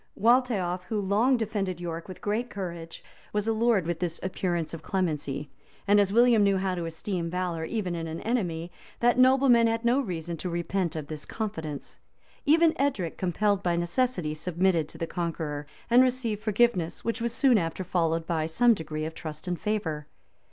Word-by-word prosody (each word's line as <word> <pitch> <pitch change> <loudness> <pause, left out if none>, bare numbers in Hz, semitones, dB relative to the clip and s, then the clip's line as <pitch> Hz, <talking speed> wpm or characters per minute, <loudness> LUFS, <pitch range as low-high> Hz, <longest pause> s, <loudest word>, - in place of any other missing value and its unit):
Waltheof, 225 -7 +2
who 215 +1 -2
long 210 +7 +3
defended 200 -5 -2
York 170 -1 -5
with 185 - -9
great 225 +4 -1
courage, 170 -4 -6 0.3
was 210 +1 -1
allured 225 -4 +2
with 170 -1 -2
this 170 -2 -2
appearance 175 -3 -2
of 165 - -6
clemency; 150 -6 -2 0.4
and 205 +1 +6
as 200 -1 +3
William 235 0 +5
knew 200 -1 +4
how 190 0 0
to 175 -2 -3
esteem 170 +1 -3
valor, 175 -2 -2
even 190 -3 -2
in 165 -1 -3
an 160 +1 -5
enemy, 175 -8 -1 0.3
that 240 +1 +3
nobleman 255 -2 +6
had 225 +1 -1
no 245 +3 +4
reason 170 - -4
to 180 - -4
repent 170 0 -1
of 155 -2 -4
this 150 0 -7
confidence.[] 160 -10 -5 0.5
Even 325 +2 +5
Edric, 220 - 0
compelled 200 +2 +1
by 175 -3 +1
necessity, 175 -1 0
submitted 170 0 0
to - - -12
the 165 - -2
conqueror, 160 -4 -3 0.2
and 240 +2 +6
received 250 -5 0
forgiveness, 215 -6 +1
which 230 0 -1
was 235 0 0
soon 250 -1 +4
after 165 +2 -3
followed 165 -2 0
by 160 -2 -1
some 235 +9 +4
degree 155 -4 -4
of 160 - -5
trust 155 +1 -8
and 175 -1 -2
favor. 165 -9 -2
185 Hz, 180 wpm, -27 LUFS, 165-225 Hz, 0.5 s, and